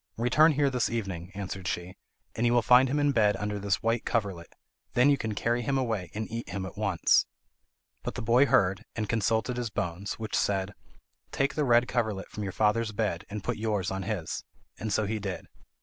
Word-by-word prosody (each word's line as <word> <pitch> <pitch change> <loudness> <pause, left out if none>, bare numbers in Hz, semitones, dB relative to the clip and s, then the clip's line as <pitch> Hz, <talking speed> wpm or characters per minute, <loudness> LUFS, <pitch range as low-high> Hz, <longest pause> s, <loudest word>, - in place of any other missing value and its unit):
"Return 150 +8 +4
here 140 -1 +2
this 125 -2 +1
evening," 95 -6 -4
answered 95 -2 -5
she, 90 +2 -3 0.4
"and 115 - -2
you 120 0 +3
will 120 -1 +4
find 125 +4 +6
him 145 - 0
in 145 0 +3
bed 105 -5 +3
under 105 0 -3
this 100 -1 -1
white 115 +1 +1
coverlet. 100 -7 -2 0.4
Then 125 +4 +5
you 140 - +3
can 110 -2 -3
carry 120 +3 0
him 135 +3 0
away, 110 -9 -1
and 110 +1 -3
eat 115 +1 -5
him 95 +1 -4
at 95 - -8
once." 100 -5 +2 0.7
But - - -5
the - - -4
boy 120 +5 +5
heard, 95 -4 +3
and 110 -2 -2
consulted 110 +3 0
his 120 -2 -2
bones, 95 -1 -3
which 110 -1 -4
said: 95 0 0 0.6
"Take 140 0 0
the 150 - 0
red 120 -1 +4
coverlet 110 -6 -1
from 105 - -6
your 100 -2 -3
father's 110 +2 +1
bed, 100 -5 -2
and 105 -1 -5
put - - -2
yours 105 -4 -1
on 95 0 -3
his," 95 -4 -3 0.4
and 110 - -3
so 105 +2 +1
he 110 +2 -2
did. 100 -2 -5
110 Hz, 210 wpm, -28 LUFS, 100-120 Hz, 0.7 s, find